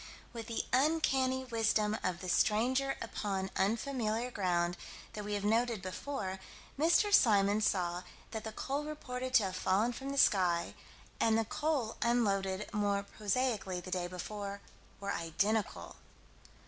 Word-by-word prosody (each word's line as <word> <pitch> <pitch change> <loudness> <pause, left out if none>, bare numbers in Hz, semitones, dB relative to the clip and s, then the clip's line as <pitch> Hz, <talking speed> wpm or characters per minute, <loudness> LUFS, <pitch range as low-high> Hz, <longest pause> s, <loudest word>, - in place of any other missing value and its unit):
With 230 -2 -6
the 230 - -2
uncanny 265 -2 +2
wisdom 220 -3 +1
of 180 -1 -1
the 185 - -5
stranger 250 +9 +2
upon 195 -4 -3
unfamiliar 230 +2 0
ground 175 -4 0 0.4
that 210 - -5
we 205 0 -2
have 200 - -3
noted 230 +1 +2
before, 190 -1 -4 0.4
Mr. 340 +8 +3
Symons 205 - +5
saw 175 -2 0 0.3
that 220 -1 -4
the 220 - -5
coal 275 +6 -3
reported 255 -4 -5
to 230 - +7
have 190 -1 -2
fallen 200 +6 +1
from 270 +3 -6
the 280 - -3
sky, 180 -8 +3 0.5
and 225 -1 +3
the 225 - +1
coal 280 -3 -1
unloaded 200 -4 +1
more 205 -1 +1
prosaically 205 -3 -1
the 185 +1 -9
day 180 -1 -1
before, 200 +3 -5 0.4
were 200 0 -3
identical. 170 - -1
215 Hz, 140 wpm, -33 LUFS, 190-250 Hz, 0.5 s, to